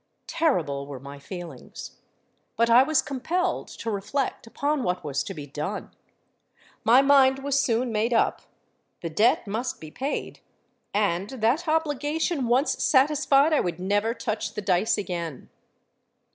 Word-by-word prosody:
Terrible 165 Hz, -, 0 dB
were 140 Hz, -2 st, -7 dB
my 140 Hz, +2 st, -10 dB
feelings. 170 Hz, -3 st, -9 dB, 0.6 s
But 230 Hz, +1 st, +2 dB
I 240 Hz, +2 st, +8 dB
was 295 Hz, +1 st, +2 dB
compelled 335 Hz, +7 st, -2 dB
to 230 Hz, -, -5 dB
reflect 215 Hz, +5 st, -2 dB
upon 285 Hz, +5 st, -1 dB
what 180 Hz, -4 st, -1 dB
was 140 Hz, -2 st, -2 dB
to 195 Hz, -, -6 dB
be 150 Hz, -2 st, -7 dB
done. 150 Hz, +8 st, -5 dB, 0.9 s
My 245 Hz, +5 st, +6 dB
mind 270 Hz, -1 st, +5 dB
was 280 Hz, 0 st, +1 dB
soon 240 Hz, -2 st, +1 dB
made 220 Hz, +2 st, 0 dB
up. 230 Hz, -, +2 dB, 0.6 s
The 165 Hz, -, -4 dB
debt 220 Hz, +11 st, +3 dB
must 225 Hz, +5 st, -3 dB
be 155 Hz, -1 st, -10 dB
paid; 275 Hz, -, -4 dB, 0.5 s
and, 200 Hz, -2 st, 0 dB
that 260 Hz, +6 st, 0 dB
obligation 305 Hz, -1 st, 0 dB
once 255 Hz, +5 st, +1 dB
satisfied, 285 Hz, +1 st, +4 dB
I 300 Hz, -, +4 dB
would 175 Hz, -1 st, -2 dB
never 205 Hz, +5 st, 0 dB
touch 215 Hz, -4 st, -3 dB
the 210 Hz, -, -3 dB
dice 190 Hz, +4 st, +2 dB
again! 170 Hz, -7 st, -5 dB
230 Hz, 145 wpm, -25 LUFS, 180-275 Hz, 0.9 s, I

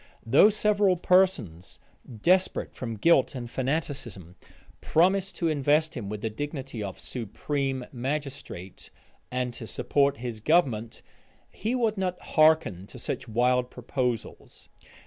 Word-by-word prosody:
Though 135 Hz, -, +6 dB
several 205 Hz, -3 st, +2 dB
persons, 175 Hz, -, +1 dB, 0.5 s
desperate 185 Hz, +1 st, +2 dB
from 115 Hz, -3 st, -5 dB
guilt 140 Hz, +3 st, +3 dB
and 120 Hz, -2 st, -5 dB
fanaticism, 130 Hz, -, -4 dB, 0.5 s
promised 190 Hz, +4 st, +2 dB
to 170 Hz, -, -1 dB
invest 155 Hz, +1 st, +2 dB
him 110 Hz, -6 st, -5 dB
with 105 Hz, 0 st, -5 dB
the 110 Hz, -, -1 dB
dignity 135 Hz, -1 st, -5 dB
of 100 Hz, -2 st, -6 dB
supreme 130 Hz, +3 st, -3 dB
magistrate, 135 Hz, -8 st, -5 dB, 0.4 s
and 125 Hz, -1 st, -2 dB
to 115 Hz, -1 st, -8 dB
support 140 Hz, +2 st, +1 dB
his 120 Hz, -2 st, -5 dB
government, 115 Hz, -5 st, +1 dB, 0.5 s
he 230 Hz, +4 st, -2 dB
would 225 Hz, -5 st, 0 dB
not 180 Hz, -1 st, -2 dB
hearken 155 Hz, -, +2 dB
to -, -, -11 dB
such -, -, -4 dB
wild 125 Hz, +2 st, +2 dB
proposals. 125 Hz, -2 st, -4 dB
135 Hz, 125 wpm, -27 LUFS, 115-165 Hz, 0.5 s, Though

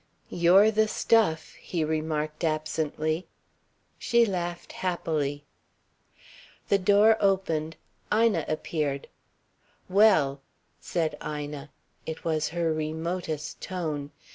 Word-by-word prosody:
"You're 185 Hz, +5 st, +5 dB
the 220 Hz, 0 st, +2 dB
stuff," 205 Hz, -8 st, +2 dB
he 170 Hz, -3 st, -2 dB
remarked 155 Hz, 0 st, -2 dB
absently. 155 Hz, +1 st, -1 dB, 0.7 s
She 235 Hz, 0 st, +3 dB
laughed 175 Hz, -4 st, -4 dB
happily. 150 Hz, -5 st, -2 dB, 1.2 s
The 200 Hz, -, +4 dB
door 205 Hz, +3 st, +5 dB
opened. 165 Hz, -6 st, 0 dB, 0.4 s
Ina 215 Hz, -7 st, +3 dB
appeared. 155 Hz, -2 st, -2 dB, 0.8 s
"Well!" 180 Hz, -9 st, +4 dB, 0.4 s
said 160 Hz, -3 st, -2 dB
Ina. 150 Hz, -1 st, -5 dB, 0.4 s
It 160 Hz, 0 st, -6 dB
was 155 Hz, -2 st, 0 dB
her 165 Hz, -1 st, 0 dB
remotest 155 Hz, 0 st, -4 dB
tone. 155 Hz, -6 st, -4 dB
160 Hz, 90 wpm, -27 LUFS, 155-185 Hz, 1.2 s, You're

